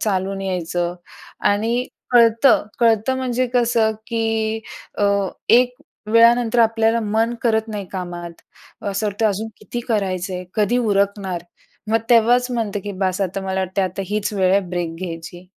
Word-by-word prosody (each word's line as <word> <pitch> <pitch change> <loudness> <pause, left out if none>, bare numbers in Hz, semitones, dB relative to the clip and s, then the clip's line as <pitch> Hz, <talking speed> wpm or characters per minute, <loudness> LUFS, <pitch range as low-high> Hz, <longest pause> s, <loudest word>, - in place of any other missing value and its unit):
चालून 195 -1 -1
यायचं 175 -2 -2 0.6
आणि 230 +5 0 0.2
कळतं, 235 0 +5
कळतं 230 +2 +2
म्हणजे 255 -1 0
कसं 235 -2 +3
की 225 -1 -1 0.4
अ, 205 - +2 0.4
एक 250 +1 +5 0.4
वेळानंतर 235 +1 +5
आपल्याला 225 0 +3
मन 225 +2 0
करत 220 -1 +1
नाही 205 -2 -4
कामात. 175 -2 -5 0.5
असं 200 +1 -2
वाटतं 205 +2 0
अजून 210 +3 -3
किती 240 +4 -6
करायचंय, 185 -4 -1
कधी 215 +3 +2
उरकणार? 200 -5 0 0.5
मग 225 - +4
तेव्हाच 240 +2 +4
म्हणते 220 -4 -2
की 205 +1 -6
बास 185 0 0
आता 195 0 -1
मला 190 0 -2
वाटतं 190 +1 -1
आता 185 +1 -3
हीच 210 +1 -2
वेळ 190 -2 +2
आहे 195 +1 +4
ब्रेक 175 -2 -3
घ्यायची. 175 0 -7
210 Hz, 140 wpm, -20 LUFS, 190-230 Hz, 0.6 s, कळतं